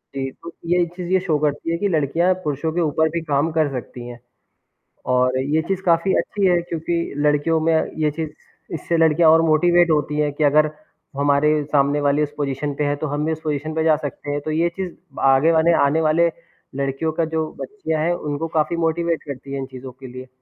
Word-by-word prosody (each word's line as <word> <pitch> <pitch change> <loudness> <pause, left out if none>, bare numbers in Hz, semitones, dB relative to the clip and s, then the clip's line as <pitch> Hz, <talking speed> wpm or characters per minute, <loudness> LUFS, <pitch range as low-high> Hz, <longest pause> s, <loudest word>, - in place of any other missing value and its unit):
जी, 135 -1 -3
तो 170 +5 -11
ये 175 +1 +2
चीज़ 180 -1 -6
ये 190 - +4
शो 165 -5 0
करती 150 +2 -1
है 170 - 0
कि 200 +4 0
लड़कियाँ 165 +2 +1
पुरुषों 150 +2 -2
के 175 - 0
ऊपर 160 0 +1
भी 170 +1 -3
काम 150 +1 +1
कर 155 -2 +1
सकती 125 -1 -7
हैं 120 -1 -9 0.9
और 125 0 +2
ये 145 +4 +1
चीज़ 195 -1 -1
काफ़ी 170 +2 +3
अच्छी 200 -2 -1
है 175 -1 +3
क्योंकि 170 0 -3 0.2
लड़कियों 150 +2 +2
में 165 +1 +2 0.3
ये 150 -1 +2
चीज़ 160 +1 -4 0.4
इससे 165 +1 -1
लड़कियाँ 160 0 +4
और 160 +1 +6
मोटिवेट 175 +2 +4
होती 150 0 0
हैं 150 -1 +1
कि 150 - -1
अगर 150 +1 +4 0.5
हमारे 145 +1 +2
सामने 145 0 +2
वाली 145 +1 +2
उस 145 0 -4
पोजीशन 140 0 -2
पे 150 - -1
है 145 0 0
तो 155 +2 -4
हम 145 +1 -2
भी 160 - 0
उस 160 0 -4
पोजीशन 155 0 -3
पे 160 - +1
जा 160 -1 +4
सकते 145 0 -6
हैं। 145 - -1
तो 155 - -4
ये 165 +2 +1
चीज़ 185 -3 -4 0.3
आगे 135 +4 +4
वाले 165 +1 +4
आने 155 +3 +2
वाले 160 +2 +3 0.5
लड़कियों 140 +3 -1
का 165 0 0
जो 160 -1 -2
बच्चियाँ 355 - -3
है, 175 +2 +1
उनको 150 0 -3
काफ़ी 160 +1 0
मोटिवेट 165 0 0
करती 140 -1 -8
है - - -2
इन 135 - -3
चीज़ों 130 0 -10
के 130 +1 -12
लिए। 130 +1 -9
155 Hz, 220 wpm, -21 LUFS, 145-165 Hz, 0.9 s, और